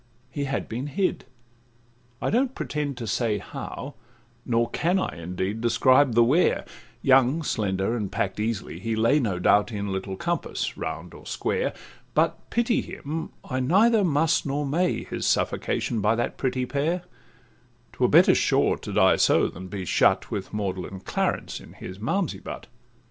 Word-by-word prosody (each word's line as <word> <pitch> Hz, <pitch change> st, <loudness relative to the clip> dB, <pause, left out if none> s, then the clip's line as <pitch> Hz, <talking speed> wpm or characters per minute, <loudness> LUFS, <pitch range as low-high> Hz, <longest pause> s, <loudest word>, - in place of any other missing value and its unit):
He 140 Hz, +2 st, -2 dB
had 135 Hz, 0 st, -2 dB
been 125 Hz, +5 st, -4 dB
hid—I 120 Hz, -6 st, -6 dB
don't 255 Hz, +4 st, +1 dB
pretend 145 Hz, -3 st, -3 dB
to 120 Hz, -, -5 dB
say 110 Hz, 0 st, 0 dB
How, 135 Hz, +7 st, -7 dB, 0.5 s
nor 115 Hz, -1 st, +2 dB
can 175 Hz, +3 st, +1 dB
I 190 Hz, -, -2 dB
indeed 95 Hz, +5 st, -3 dB
describe 130 Hz, +2 st, +4 dB
the 120 Hz, -, +7 dB
where— 145 Hz, +10 st, +3 dB, 0.4 s
Young, 135 Hz, +4 st, +4 dB
slender, 100 Hz, -3 st, 0 dB
and 105 Hz, -5 st, -3 dB
pack'd 95 Hz, +1 st, -2 dB
easily, 105 Hz, -6 st, -3 dB
he 115 Hz, +3 st, -2 dB
lay, 115 Hz, +7 st, +3 dB
No 105 Hz, -9 st, -1 dB
doubt, 105 Hz, +5 st, +3 dB
in 100 Hz, -2 st, -3 dB
little 95 Hz, 0 st, -3 dB
compass, 170 Hz, -, -2 dB
round -, -, -5 dB
or -, -, -12 dB
square; 475 Hz, -, -1 dB, 0.4 s
But -, -, +1 dB
pity 235 Hz, 0 st, +1 dB
him 160 Hz, +3 st, -5 dB, 0.2 s
I 130 Hz, -2 st, -2 dB
neither 205 Hz, -, +4 dB
must 160 Hz, -1 st, +2 dB
nor 145 Hz, +1 st, -2 dB
may 170 Hz, +6 st, 0 dB
His -, -, -3 dB
suffocation 115 Hz, -3 st, 0 dB
by 105 Hz, +2 st, +3 dB
that 120 Hz, +1 st, -2 dB
pretty 130 Hz, -1 st, -1 dB
pair; 155 Hz, +7 st, -1 dB, 0.9 s
'Twere -, -, +2 dB
better, -, -, +7 dB
sure, -, -, +2 dB
to -, -, -7 dB
die -, -, +4 dB
so, -, -, +4 dB
than 95 Hz, +2 st, -9 dB
be 95 Hz, -1 st, -5 dB
shut -, -, +2 dB
With 100 Hz, -2 st, -4 dB
maudlin 95 Hz, -2 st, -4 dB
Clarence -, -, -2 dB
in -, -, -14 dB
his 95 Hz, +1 st, -9 dB
Malmsey 180 Hz, -, -1 dB
butt. -, -, -8 dB
120 Hz, 160 wpm, -25 LUFS, 105-150 Hz, 0.9 s, the